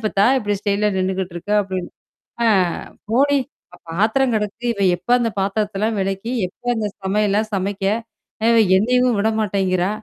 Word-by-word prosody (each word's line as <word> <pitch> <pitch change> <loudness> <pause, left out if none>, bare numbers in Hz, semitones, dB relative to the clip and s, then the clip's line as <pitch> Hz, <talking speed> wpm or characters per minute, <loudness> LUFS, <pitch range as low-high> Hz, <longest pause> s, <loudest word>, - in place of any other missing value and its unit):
அப்பத்தா 210 -2 +2
இப்படி 205 -1 -1
ஸ்டைல்லா 205 0 +1
நின்னுகிட்டு 185 -1 -2
இருக்க? 195 +5 -4
அப்படின்னு 185 -2 -5 0.6
ஆ, - - +4 0.6
போடி! 280 +3 +3 0.5
பாத்திரம் 225 +8 +2
கிடக்கு. 210 +2 -3
இவ 200 - -5 0.2
எப்ப 180 +6 -20
அந்தப் 230 -4 -2
பாத்திரத்த 200 +1 -1
எல்லாம் 220 0 0
விளக்கி, 195 +5 -3 0.2
எப்ப 245 - -30
அந்தச் 210 -3 -3
சமையல்லாம் 210 +2 +1
சமைக்க? 195 +1 -2 0.9
என்னையும் 250 +2 +2
விட 220 +2 +2
மாட்டேங்குறா. 190 -2 0
205 Hz, 140 wpm, -20 LUFS, 195-220 Hz, 0.9 s, ஆ